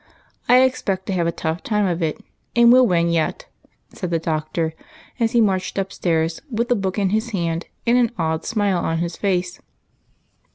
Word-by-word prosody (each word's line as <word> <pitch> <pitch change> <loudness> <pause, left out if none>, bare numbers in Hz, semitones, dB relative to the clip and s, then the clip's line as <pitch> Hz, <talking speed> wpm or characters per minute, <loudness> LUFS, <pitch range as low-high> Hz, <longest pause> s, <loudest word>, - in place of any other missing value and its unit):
I 250 +1 +7
expect 200 -7 -1
to 195 - -2
have 170 -2 +1
a - - +1
tough 160 0 -3
time 210 -2 0
of 175 -2 -1
it, 160 -2 0
but - - -22 0.3
we 235 - +5
'11 245 +1 +7
win 170 -1 +2
yet," 165 -2 -1 0.5
said 180 - -4
the 170 - +1
Doctor, 160 0 -2 0.5
as 230 0 +1
he 235 - +4
marched 190 -3 0
ujDstairs 170 -4 -1
with 235 -1 -1
the 245 - +4
book 195 -2 -2
in 195 -2 +1
his 220 +3 0
hand, 170 -5 -2 0.2
and 240 +1 +4
an 235 -2 +2
odd 160 -1 -1
smile 205 -5 0
on 165 -1 -1
his 170 0 -2
face. 180 -2 -1
185 Hz, 195 wpm, -21 LUFS, 165-220 Hz, 0.5 s, I